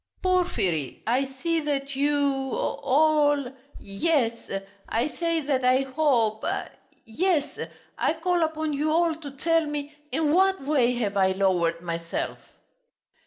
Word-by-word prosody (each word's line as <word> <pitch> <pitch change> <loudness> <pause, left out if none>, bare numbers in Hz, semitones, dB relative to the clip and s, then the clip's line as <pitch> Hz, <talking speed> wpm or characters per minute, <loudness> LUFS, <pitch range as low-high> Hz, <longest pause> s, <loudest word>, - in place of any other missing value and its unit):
"Porfiry, 270 - 0
I 250 +4 +2
see 320 +5 -2
that 280 -2 -2
you... 290 +2 +2 0.4
all... 290 -2 +2 0.3
yes! 240 +3 +1 0.6
I 235 +5 +1
say 335 0 -1
that 275 -3 0
I 255 +1 +4
hope... 260 -6 +1 0.6
yes, 315 +6 0 0.4
I - - +2
call 350 +2 0
upon 315 -1 -1
you 300 +2 0
all 335 +1 +3
to 310 -2 -8
tell 325 +3 +1
me 295 0 -4 0.2
in 310 -2 +1
what 380 +2 +3
way 255 -4 +2
have 210 -4 -2
I 190 -1 +3
lowered 175 -4 +1
myself?" 170 -1 -4
285 Hz, 125 wpm, -26 LUFS, 235-320 Hz, 0.6 s, I